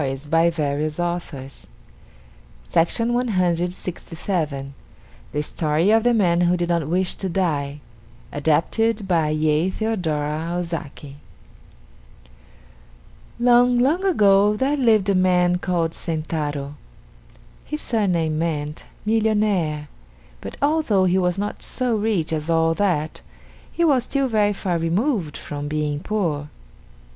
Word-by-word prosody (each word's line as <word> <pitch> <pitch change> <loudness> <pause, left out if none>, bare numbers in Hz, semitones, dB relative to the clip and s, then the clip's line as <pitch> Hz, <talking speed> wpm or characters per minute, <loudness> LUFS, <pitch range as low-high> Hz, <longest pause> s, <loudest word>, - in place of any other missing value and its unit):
Used 135 +2 -4
by 165 +1 +4
permission.] 145 -4 -1
JAPANESE 160 -5 -5 1.0
STORIES 165 - +4 2.5
THE 150 - -1
STORY 155 +5 +1
OF 225 0 +4
THE 245 0 +3
MAN 175 -5 +3
WHO 175 0 +3
DID 175 0 -2
NOT 170 -4 0
WISH 180 +3 0
TO 190 - -4
DIE 150 -6 -1 0.5
ADAPTED 195 +9 +1
BY 165 -4 +2
YEI 155 +3 +1
THEODORA 165 -6 -2
OZAKI 160 -5 -6 2.2
Long, 245 0 +5
long 290 +10 +2
ago 205 - +4
there 270 +6 +1
lived 225 -7 +3
a - - +4
man 180 -1 +3
called 175 -3 0
Sentaro. 150 -3 -3 0.9
His 300 - -5
surname 175 -9 0
meant 150 -2 -3 0.2
"Millionaire," 210 -9 +1 0.5
but - - -8
although 285 -11 +2
he 185 +1 +2
was 180 0 0
not 205 +1 -3
so 250 -3 -1
rich 205 -7 0
as 155 +1 -3
all 165 0 +3
that, 165 -5 -1 0.5
he 340 - +1
was 270 -6 +3
still 275 -1 0
very 210 -3 +2
far 180 -4 -2
removed 175 - 0
from 145 0 -6
being 150 -1 -1
poor. 160 -7 -2
175 Hz, 115 wpm, -22 LUFS, 155-210 Hz, 2.5 s, Long